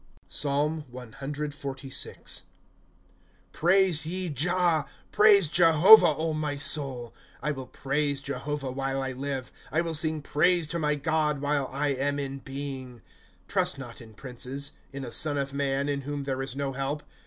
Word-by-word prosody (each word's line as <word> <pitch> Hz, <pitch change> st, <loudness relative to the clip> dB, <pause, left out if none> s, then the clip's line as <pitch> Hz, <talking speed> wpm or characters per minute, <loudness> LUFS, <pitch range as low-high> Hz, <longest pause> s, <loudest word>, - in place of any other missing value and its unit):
PSALM 150 Hz, +2 st, 0 dB
CXLYI. 135 Hz, +2 st, -4 dB, 0.5 s
' -, -, -35 dB
Praise 180 Hz, -2 st, +4 dB
ye 180 Hz, +1 st, -3 dB
Jah. 165 Hz, +1 st, +1 dB, 0.2 s
Praise 205 Hz, -4 st, +6 dB
Jehovah, 165 Hz, 0 st, +6 dB
my 150 Hz, -2 st, -2 dB
soul. 135 Hz, -5 st, +1 dB
* -, -, -25 dB
I 150 Hz, -, 0 dB
will 135 Hz, -3 st, -6 dB
praise 140 Hz, 0 st, -1 dB
Jehovah 140 Hz, 0 st, -4 dB
while 135 Hz, +1 st, -2 dB
I 135 Hz, -, -3 dB
live; 135 Hz, 0 st, -4 dB, 0.2 s
I 160 Hz, +4 st, +2 dB
will 165 Hz, -1 st, -3 dB
sing 155 Hz, -1 st, +1 dB
praise 175 Hz, +4 st, +2 dB
to 170 Hz, -, -1 dB
my 150 Hz, -1 st, +1 dB
God 150 Hz, 0 st, 0 dB
while 145 Hz, -1 st, 0 dB
I 145 Hz, +2 st, -1 dB
am 140 Hz, +1 st, -1 dB
in 140 Hz, -1 st, -4 dB
being. 135 Hz, -3 st, -7 dB, 0.4 s
^ -, -, -35 dB
Trust 140 Hz, -, +1 dB
not 125 Hz, -4 st, -9 dB
in 110 Hz, -2 st, -14 dB
princes, 130 Hz, +3 st, -4 dB, 0.2 s
In 135 Hz, -1 st, -6 dB
a 120 Hz, -, -7 dB
son 145 Hz, +2 st, 0 dB
of 140 Hz, 0 st, -2 dB
man, 140 Hz, 0 st, 0 dB
in 140 Hz, -1 st, -1 dB
whom 145 Hz, +1 st, -4 dB
there 135 Hz, -1 st, -2 dB
is 135 Hz, -1 st, -5 dB
no 140 Hz, -1 st, -2 dB
help. 135 Hz, +3 st, -3 dB
140 Hz, 160 wpm, -27 LUFS, 135-155 Hz, 0.5 s, Praise